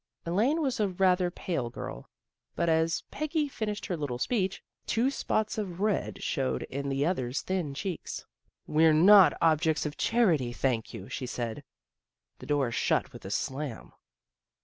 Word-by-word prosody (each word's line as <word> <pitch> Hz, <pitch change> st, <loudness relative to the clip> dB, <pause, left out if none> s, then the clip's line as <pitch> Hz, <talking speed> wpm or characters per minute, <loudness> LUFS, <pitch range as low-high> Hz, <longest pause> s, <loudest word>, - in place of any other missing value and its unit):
Elaine 235 Hz, -, +2 dB
was 265 Hz, -3 st, -1 dB
a 210 Hz, -, +3 dB
rather 185 Hz, -1 st, +2 dB
pale 165 Hz, -8 st, -3 dB
girl. -, -, -8 dB, 0.5 s
But 170 Hz, -, +1 dB
as 160 Hz, +1 st, +2 dB
Peggy 305 Hz, 0 st, -1 dB
finished 215 Hz, -6 st, -4 dB
her 185 Hz, -, -2 dB
little 145 Hz, -6 st, -3 dB
speech, 195 Hz, -, -1 dB, 0.2 s
two 245 Hz, +4 st, +2 dB
spots 215 Hz, -5 st, -1 dB
of 185 Hz, -4 st, -5 dB
red 210 Hz, 0 st, -1 dB
showed 135 Hz, -5 st, -1 dB
in 140 Hz, +1 st, -4 dB
the 135 Hz, +1 st, 0 dB
other's 130 Hz, -7 st, -1 dB
thin 175 Hz, -7 st, -2 dB
cheeks. 185 Hz, +3 st, -5 dB, 0.2 s
" -, -, -43 dB
We're 155 Hz, +1 st, +4 dB
not 195 Hz, +4 st, +7 dB
objects 160 Hz, -1 st, +3 dB
of 150 Hz, 0 st, -4 dB
charity, 165 Hz, -, +2 dB
thank 120 Hz, -3 st, -1 dB
you," 95 Hz, -, -8 dB
she 130 Hz, -, -5 dB
said. 120 Hz, -2 st, -4 dB, 0.8 s
The -, -, -10 dB
door 140 Hz, -5 st, +1 dB
shut -, -, 0 dB
with -, -, -11 dB
a -, -, -5 dB
slam. 135 Hz, +3 st, -4 dB
165 Hz, 160 wpm, -29 LUFS, 135-205 Hz, 0.8 s, not